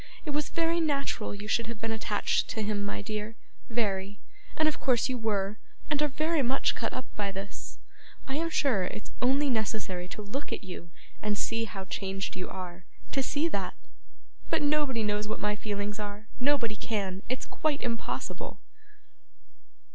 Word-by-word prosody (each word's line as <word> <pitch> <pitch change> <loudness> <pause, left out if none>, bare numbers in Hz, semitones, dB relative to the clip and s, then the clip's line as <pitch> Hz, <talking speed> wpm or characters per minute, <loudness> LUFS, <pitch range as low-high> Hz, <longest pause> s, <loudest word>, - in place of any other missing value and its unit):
It 300 - 0
was 295 0 +1
very 335 0 +3
natural 280 -9 +1
you 205 +1 -6
should 230 +1 +2
have 230 -2 -4
been 225 +1 0
attached 215 -2 +2
to 220 - -1
him, 205 -1 +1
my 205 0 -2
dear 215 +1 -3 0.3
very 205 -3 0 0.4
and 315 - +5
of 310 - +1
course 255 -2 +4
you 255 - +1
were, 210 -2 +1 0.3
and 295 0 +3
are 300 - +5
very 310 +2 +2
much 260 +1 +3
cut 225 - -1
up 255 - -3
by 200 -1 0
this. 195 +1 -6 0.5
I 270 - -1
am 330 +1 +1
sure 255 - +3
it's 210 - -5
only 270 +4 +5
necessary 215 -6 0
to 210 - -6
look 260 +8 -3
at - - -2
you 180 -2 -7 0.3
and 210 -1 +1
see 225 +1 +1
how 195 -3 -5
changed 195 0 -2
you 185 - -3
are, 180 -1 -6 0.3
to 275 - +3
see 290 +4 +2
that; - - -1 0.7
but - - +3
nobody 290 -6 +3
knows 210 0 +1
what 215 - -2
my 210 0 +2
feelings 205 0 -2
are 210 +1 -4
nobody 255 -5 +3
can 195 -3 -1
it's 255 - 0
quite 300 -2 0
impossible! 230 -2 -2
220 Hz, 175 wpm, -31 LUFS, 205-270 Hz, 0.7 s, and